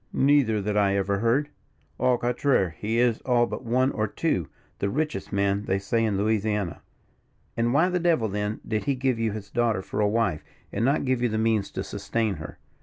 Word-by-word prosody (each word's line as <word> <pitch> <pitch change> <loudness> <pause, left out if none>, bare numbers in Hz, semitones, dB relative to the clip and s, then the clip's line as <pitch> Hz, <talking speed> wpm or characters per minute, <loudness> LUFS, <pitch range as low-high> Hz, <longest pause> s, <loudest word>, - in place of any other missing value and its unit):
"Neither, 135 -7 +3
that 105 +1 -1
I 100 -1 +3
ever 100 0 0
heard. 125 +7 +1 0.5
Au 125 -1 +3
contraire, 120 - +1
he 105 +8 -3
is, 120 -2 +2
all 120 -2 +3
but - - -6
one 130 +3 +2
or 110 0 -1
two, 100 - -1 0.3
the 100 - 0
richest 155 +7 -2
man 100 0 0
they 95 - +1
say 100 +4 0
in 105 -3 +1
Louisiana." 105 -3 0 0.7
"And 115 +1 +1
why 155 +7 +4
the 180 -1 0
devil, 165 -10 +2
then, 105 +1 -3
did 110 -1 -1
he 140 -1 +1
give 130 -2 0
you 115 -1 0
his 100 -1 -7
daughter 115 -5 +1
for - - -5
a 105 - +3
wife, 110 -8 0 0.3
and 105 - -1
not 140 +3 +2
give 130 -2 +1
you 120 - +2
the 110 - -1
means 110 -2 +1
to - - -3
sustain 110 -5 -2
her." 75 0 -9
110 Hz, 205 wpm, -26 LUFS, 100-125 Hz, 0.7 s, why